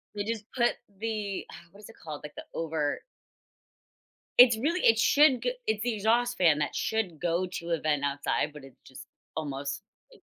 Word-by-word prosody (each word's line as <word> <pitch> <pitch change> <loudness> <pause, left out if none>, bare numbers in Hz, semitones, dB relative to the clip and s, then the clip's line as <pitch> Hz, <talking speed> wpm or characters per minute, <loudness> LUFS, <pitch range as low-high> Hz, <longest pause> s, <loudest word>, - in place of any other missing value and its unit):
They 205 - -2
just 220 0 -4
put 240 -2 +3 0.3
the 210 -3 -3
uh, 170 - -13
what 200 - -16
is 210 - -12
it 225 - -14
called? 150 -2 -7
Like, 150 - -9
the - - -8
over 160 -3 -2 1.4
It's 245 -2 +8
really 335 +8 0
it 225 -1 +5
should 275 0 +5
g 245 0 0
it's 215 -1 0
the 245 -1 0
exhaust 235 +4 +1
fan 160 -5 +4
that 150 - -2
should 200 -8 -1
go 175 +1 0
to 170 -1 -5
a 165 - +1
vent 150 -2 0
outside, 140 +1 -1
but 150 -2 -11
it's 135 -2 -15
just 130 0 -12 0.3
almost 140 -2 -4 0.3
it - - -19
190 Hz, 190 wpm, -28 LUFS, 150-225 Hz, 1.4 s, It's